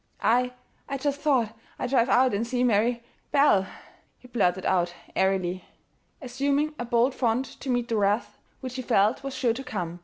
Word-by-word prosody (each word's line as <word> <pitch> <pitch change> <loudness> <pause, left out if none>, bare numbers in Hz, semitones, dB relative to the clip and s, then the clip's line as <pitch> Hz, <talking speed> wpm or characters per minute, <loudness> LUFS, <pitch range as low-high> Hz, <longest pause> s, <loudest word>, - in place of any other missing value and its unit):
"I 250 +2 +2 0.4
I 275 - -2
just 285 +1 -2
thought 245 -7 +1 0.2
I'd 250 - -3
drive 250 -2 +3
out 255 -1 +4
and 220 +3 -1
see 250 0 0
Mary 235 +1 +2 0.3
Belle," 275 -10 +4 0.5
he 250 - -16
blurted 190 -6 0
out 175 -1 +1 0.2
airily, 185 -1 0 0.6
assuming 280 +4 0
a 240 - -2
bold 240 +2 +2
front 245 +1 0 0.2
to 270 - -5
meet 245 -1 0
the 230 - -1
wrath 205 +2 0 0.2
which 255 -1 -6
he - - -2
felt 220 -2 +2
was 275 -1 -5
sure 240 -3 +1
to 265 +3 -6
come. 175 -8 -5
240 Hz, 180 wpm, -26 LUFS, 205-260 Hz, 0.6 s, out